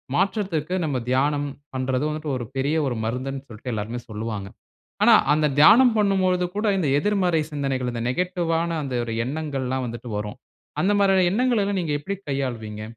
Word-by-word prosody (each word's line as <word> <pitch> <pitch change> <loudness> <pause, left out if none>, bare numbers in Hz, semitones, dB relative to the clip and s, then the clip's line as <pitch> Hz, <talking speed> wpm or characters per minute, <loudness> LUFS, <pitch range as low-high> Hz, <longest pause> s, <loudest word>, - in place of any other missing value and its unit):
மாற்றத்திற்கு 185 -4 0
நம்ம 140 -4 -1
தியானம் 145 +3 +1 0.3
பண்றது 130 +1 -1
வந்துட்டு 155 0 -4
ஒரு 120 - -5
பெரிய 140 +4 0
ஒரு 125 - -1
மருந்துன்னு 130 +3 -3
சொல்ட்டு, 120 +3 -7
எல்லாருமே 110 +3 -4
சொல்லுவாங்க. 105 -2 -4 0.6
ஆனா - - +7 0.2
அந்த 155 0 +2
தியானம் 230 - +7
பண்ணும்பொழுது 185 -3 +2
கூட, 210 +2 -1
இந்த 170 -6 0
எதிர்மறை 180 -3 +1
சிந்தனைகள் 135 -4 -2
இந்த 115 -1 -3
நெகட்டிவ்வான, 170 +2 0
அந்த 130 -2 -4
ஒரு 115 - -4
எண்ணங்கள்லாம் 130 -3 -2
வந்துட்டு 120 0 -7
வரும். 105 0 -5 0.4
அந்த 195 - +2
மாரியான 195 -2 +4
எண்ணங்களை 245 0 +2
எல்லாம் 200 -1 -1
நீங்க 160 - -3
எப்படி 200 +7 -4
கையாளுவீங்க? 115 -6 -3
145 Hz, 155 wpm, -24 LUFS, 125-180 Hz, 0.6 s, ஆனா